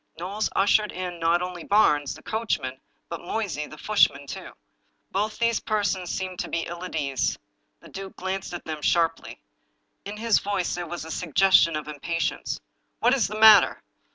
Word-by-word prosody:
Knowles 195 +6 -2
ushered 205 +2 +3
in 180 -1 -5
not 170 +2 +2
only 180 -2 -6
Barnes, 150 -9 +3
the - - -14
coachman, 145 - -2 0.3
but 170 - -6
Moysey, 180 -5 -3
the 155 - -12
footman, 145 -10 +2
too. - - -8 0.6
Both 210 +3 -1
these 230 -1 +1
persons 200 -4 -1
seemed 185 -1 -4
to - - -3
be 170 - -1
ill 175 +1 -7
at 185 - -6
ease. 140 -4 -1 0.4
The - - -14
duke 195 0 -8
glanced 190 +1 -4
at 175 - -7
them 155 -2 -5
sharply. 165 +1 0 0.6
In 200 +2 -6
liis 225 0 +2
voice 200 -3 -1
there 175 -1 -4
was 170 0 -6
a 160 - -7
suggestion 175 0 +4
of 150 -1 -4
impatience. 155 +2 -3 0.2
" - - -48
What 250 - +4
is 250 -8 +2
the 215 +2 -5
matter? 220 -2 +7
180 Hz, 180 wpm, -25 LUFS, 160-205 Hz, 0.6 s, matter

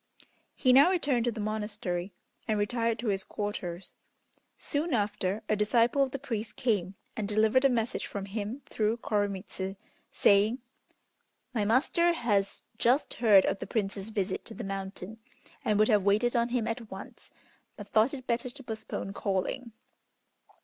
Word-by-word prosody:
He 255 -2 +4
now 280 +7 +8
returned 280 -10 +1
to 240 - +2
the 225 - -7
monastery, 210 -4 -3 0.4
and 215 - +1
retired 230 +2 0
to 230 0 -2
his 195 -1 0
quarters. 190 -4 -5 0.6
Soon 295 -1 -1
after 205 -1 -1
a 215 - +2
disciple 230 +5 +3
of 270 - +3
the 275 - -4
priest 230 -5 -4
came 200 -6 0 0.2
and 210 -2 -2
delivered 220 +5 +3
a - - +7
message 235 -1 -1
from 200 -1 -5
him 215 +6 -5
through 220 +1 0
Koremitz, 195 -3 -2 0.4
saying, 205 +4 +4 1.0
"My 215 -4 0
master 310 +10 +3
has 205 -10 0 0.2
just 250 +5 +2
heard 210 -5 +6
of 195 - 0
the - - -6
Prince's 200 -1 -2
visit 200 -3 -2
to 225 - -10
the 240 - -6
mountain, 195 +1 -6 0.4
and 210 - +2
would 215 +1 +5
have 210 -4 +4
waited 210 +5 +2
on 235 0 +2
him 240 -2 0
at 230 -1 -4
once, 190 +1 -10 0.5
but 205 - -8
thought 225 +6 +3
it 255 -2 -9
better 245 +1 -1
to 270 +2 -12
postpone 220 -4 -5
calling. 205 +6 -2
215 Hz, 160 wpm, -29 LUFS, 200-240 Hz, 1.0 s, now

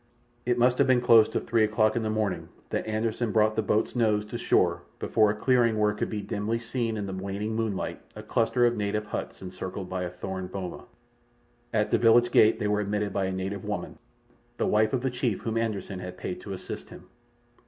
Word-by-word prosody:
It 125 0 +2
must 125 +1 +3
have - - +4
been 130 -1 +5
close 115 -3 +6
to - - -1
three 115 -1 +1
o'clock 110 0 +2
in 120 - +1
the 110 - -1
morning 110 -1 -1 0.2
that - - -2
Anderssen 110 +1 -1
brought 110 0 +3
the 110 - +2
boat's 105 +3 0
nose 105 -3 +2
to 105 - -16
the - - -3
shore - - +2 0.2
before 110 -2 +2
a 105 - 0
clearing 120 -1 +2
where 105 0 +2
could 105 - -3
be 105 -2 -4
dimly 105 +3 -2
seen 115 -1 -2
in 105 - -3
the 95 - -5
waning 100 +3 -3
moonlight 110 -4 -2
a 105 - -8
cluster 120 +2 +2
of 120 0 +2
native 105 0 -1
huts 105 - -5
encircled 95 0 -6
by 95 0 -2
a 90 - -2
thorn 95 +1 -5
boma. 90 -1 -6 0.9
At 105 -1 +1
the - - +3
village 120 +1 +5
gate 110 -1 +5
they 105 -2 -1
were 105 0 +1
admitted 105 0 -2
by 95 - 0
a 95 - -1
native 95 +1 -4
woman, - - -5 0.6
the - - 0
wife 110 0 +3
of 130 - 0
the 130 - 0
chief 120 -5 -1
whom 115 -1 -3
Anderssen 105 -4 -2
had 90 0 -7
paid 90 - -5
to 100 - -6
assist 95 - -7
him. - - -12
110 Hz, 220 wpm, -27 LUFS, 100-115 Hz, 0.9 s, close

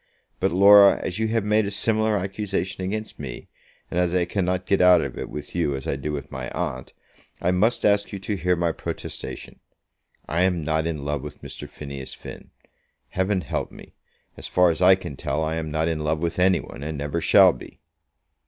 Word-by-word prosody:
But, - - +1
Laura, 100 +2 +7
as 90 +4 -3
you 110 - +1
have 115 -1 0
made 105 0 +2
a - - -1
similar 110 +1 +1
accusation 95 -1 -3
against 110 +3 -4
me, 65 -5 -7 0.4
and 90 - 0
as 90 0 +1
I 90 -1 +2
cannot 90 0 -1
get 100 - +2
out 90 0 +7
of - - -4
it - - -6
with 75 -1 -7
you 85 -5 0
as 65 - -6
I - - -1
do 70 +2 -4
with 75 -1 -6
my 65 -1 -5
aunt, 65 0 -4 0.5
I 90 - +1
must 105 +7 +2
ask 100 0 +2
you 100 - -4
to 100 +2 -3
hear 90 0 +1
my 85 -1 0
protestation. - - -7 0.7
I 80 +4 0
am 90 -3 +1
not 80 +1 0
in 75 -4 -4
love 75 -1 -2
with 75 0 -10
Mr. - - -8
Phineas 70 -2 -8
Finn. - - -11 0.6
Heaven 95 +1 0
help 70 - -3
me; - - -14 0.4
as - - -7
far 90 -1 +4
as 80 +1 -5
I 95 +1 +7
can 85 -7 -8
tell, 75 +4 -2
I 80 0 -1
am 80 -1 -3
not 80 +2 0
in 80 -2 -1
love 75 +1 0
with 85 +2 -2
any 95 0 +4
one, - - -11
and 75 +1 -4
never 75 +4 -3
shall - - +6
be." - - -13
90 Hz, 210 wpm, -24 LUFS, 75-95 Hz, 0.7 s, Laura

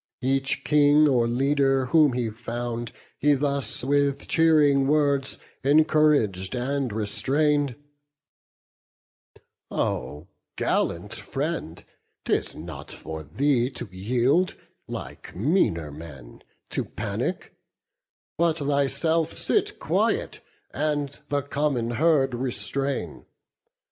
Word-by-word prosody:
Each 135 +1 0
King 150 0 +5
or 120 -4 +3
leader 135 +1 +2
whom 150 -1 +4
he 120 -3 -1
found 120 +1 -4 0.3
he 145 0 +4
thus 140 -2 -1
With 140 +1 +1
cheering 150 -4 +4
words 140 -2 +1 0.3
encourag'd 145 - +3
and 130 0 -1
restrain'd: 140 +6 +1 1.9
"O 75 +3 -2 0.3
gallant - - -1
friend, - - -4 0.4
'tis - - 0
not 75 -3 -8
for 80 0 -7
thee 125 - +1
to 120 -3 -8
yield, 125 - +1 0.3
Like - - -8
meaner 90 - +1
men, 70 -5 -11 0.3
to - - 0
panic; - - -4 0.9
but 165 -2 +2
thyself 145 +3 +1
Sit - - 0
quiet, - - 0 0.3
and 145 0 -2
the 145 -1 0
common 140 -5 -1
herd 135 0 +2
restrain. 130 - -3
135 Hz, 95 wpm, -25 LUFS, 120-145 Hz, 1.9 s, King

